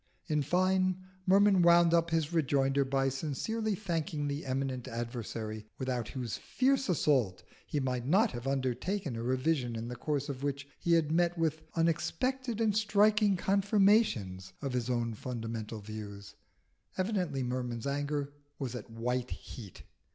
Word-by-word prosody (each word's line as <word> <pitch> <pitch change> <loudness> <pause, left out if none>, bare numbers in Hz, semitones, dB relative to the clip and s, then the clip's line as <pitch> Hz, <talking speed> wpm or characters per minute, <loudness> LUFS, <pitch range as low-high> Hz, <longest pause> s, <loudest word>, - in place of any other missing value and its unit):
In 150 -3 +1
fine, 185 +4 +2 0.3
Merman 195 0 +6
wound 170 0 +6
up 170 0 +3
his 165 -1 0
rejoinder 140 -3 +2
by 135 0 +1
sincerely 180 - -2
thanking 165 -6 -2
the 140 0 -3
eminent 130 -1 -2
adversary 115 -2 -5
without 125 -4 -2
whose 125 -2 -4
fierce 265 -2 +1
assault 135 - +2 0.2
he 145 - -1
might 125 -2 -2
not 200 - +4
have 120 +2 -6
undertaken 135 - -1
a 115 - -4
revision 130 0 0
in 115 +1 -4
the 125 - -5
course 145 +2 -2
of 135 -3 -5
which 140 0 -2
he 170 - +2
had 160 -2 +3
met 175 +1 +2
with 160 -1 0
unexpected 235 - 0
and 220 -3 +2
striking 210 -1 +4
confirmations 195 - +2
of 135 -3 -3
his 125 -1 -1
own 120 -2 0
fundamental 115 -1 -5
views. 100 -1 -8 0.6
Evidently 185 -9 0
Merman's 125 -2 -3
anger 145 0 -2 0.2
was 130 -4 -4
at 120 -3 -7
white 125 +2 -2
heat. 105 -7 -9
140 Hz, 145 wpm, -31 LUFS, 125-175 Hz, 0.6 s, Merman